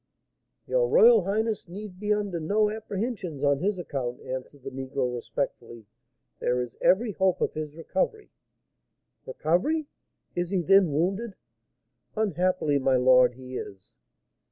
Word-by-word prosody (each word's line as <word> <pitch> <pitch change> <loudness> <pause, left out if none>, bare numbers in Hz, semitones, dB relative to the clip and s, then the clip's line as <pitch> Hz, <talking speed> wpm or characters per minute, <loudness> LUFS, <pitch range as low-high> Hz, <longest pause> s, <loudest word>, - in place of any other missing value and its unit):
"Your - - +1
royal 475 -1 +6
highness 215 +1 -1
need 190 +1 -9
be 210 0 -2
under 205 -4 0
no 210 +6 +1
apprehensions 205 - -4
on 140 -1 +3
his 195 +4 0
account," 130 -8 -4
answered 130 +1 -7
the 135 - -6
negro, 130 -1 -3
respectfully; 120 -2 -5 0.5
"there 125 0 0
is 125 -2 -4
every 215 +4 +3
hope 190 -2 +1
of - - 0
his 155 -1 -5
recovery." 190 - -2 1.0
"Recovery! 310 - 0 0.5
He 175 - -1
is, 175 - -3 0.2
then, 195 -2 +5
wounded?" 190 +8 -1 0.8
"Unhappily, 180 -7 +1
my 130 0 +2
lord, 125 -1 +5
he 130 0 -8
is." 95 -1 -9
175 Hz, 130 wpm, -27 LUFS, 135-210 Hz, 1.0 s, royal